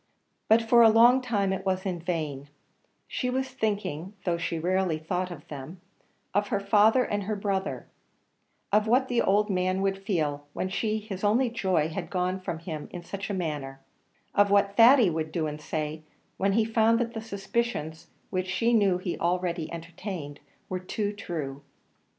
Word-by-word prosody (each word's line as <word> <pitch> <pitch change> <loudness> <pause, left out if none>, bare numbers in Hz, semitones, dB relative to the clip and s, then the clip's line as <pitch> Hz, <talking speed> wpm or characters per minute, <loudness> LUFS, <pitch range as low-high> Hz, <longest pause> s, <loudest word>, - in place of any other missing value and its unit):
But 225 +1 +5
for 235 +1 +5
a 225 - +8
long 240 +4 +6
time 205 -6 0
it 190 - -4
was 190 0 -1
in 180 -3 -2
vain; 155 -5 -3 0.6
she 250 - -2
was 260 +1 -1
thinking 205 - -3
though 170 -2 0
she 165 0 -2
rarely 180 0 +1
thought 180 +3 -2
of 165 -5 -10
them 150 +5 -8 0.5
of 205 +1 +1
her 200 - 0
father 215 +5 +4
and 205 -3 -2
her 215 +1 -1
brother; 195 -1 -2 0.9
of 210 +1 +3
what 255 +3 +3
the 245 -1 +2
old 205 +2 +3
man 185 0 +1
would 195 0 -1
feel, 150 -7 -1
when 185 - -2
she, 215 +2 -1
his 210 -3 -7
only 230 +4 +3
joy, 185 -9 +1
had 160 - -5
gone 185 0 -1
from 180 -3 -4
him 160 -2 -6
in 175 - -7
such 200 +3 -6
a - - -1
manner; 145 -6 -4 0.5
of 205 0 +4
what 200 0 +3
Thady 235 -3 +7
would 155 -1 -3
do 160 -1 -1
and 150 0 -5
say, 155 0 -3 0.4
when 195 +1 +1
he 220 +1 +3
found 225 0 +3
that 235 0 -2
the 225 - -4
suspicions, 200 -6 -3 0.2
which 185 0 -1
she 210 +7 +1
knew 200 -5 +4
he 180 -1 -4
already 175 -1 -1
entertained, 165 -3 -7 0.3
were 185 - -3
too 205 +3 -3
true. 150 -8 -5
190 Hz, 180 wpm, -27 LUFS, 165-215 Hz, 0.9 s, a